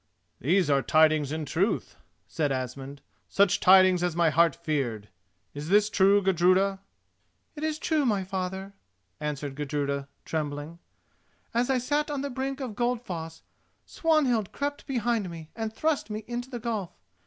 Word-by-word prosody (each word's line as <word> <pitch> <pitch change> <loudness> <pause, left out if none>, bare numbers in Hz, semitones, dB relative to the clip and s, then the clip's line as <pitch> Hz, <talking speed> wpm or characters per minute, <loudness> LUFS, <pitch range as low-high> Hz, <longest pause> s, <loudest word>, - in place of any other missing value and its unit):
"These 175 - +2
are 140 -2 +3
tidings 155 -1 +3
in 155 0 -3
truth," 175 +9 -1 0.3
said 150 -3 -1
Asmund—"such 140 +9 -1
tidings 185 -1 +6
as 175 -2 0
my 170 -2 +3
heart 165 -1 +4
feared! 135 -11 -3 0.4
Is 145 +2 -6
this 210 +2 +4
true, 200 +1 +4
Gudruda?" 190 +2 +3 0.8
"It 300 - -7
is 310 -1 -1
true, 310 -1 0
my 210 -7 +1
father," 190 +1 -4 0.5
answered 145 -2 -4
Gudruda, 140 -1 -2 0.2
trembling. 150 +1 -4 0.7
"As 240 +2 +1
I 265 - +3
sat 290 +4 0
on 285 -2 -2
the 280 0 -4
brink 270 +2 -3
of 255 -5 -4
Goldfoss, 205 -9 -3 0.4
Swanhild 270 - +1
crept 285 0 -4
behind 235 -6 0
me 160 -2 -10
and 225 -1 -3
thrust 300 +1 -1
me 215 +1 -4
into 245 +1 -4
the 245 -3 -5
gulf. 220 -6 -4
190 Hz, 145 wpm, -27 LUFS, 155-240 Hz, 0.8 s, tidings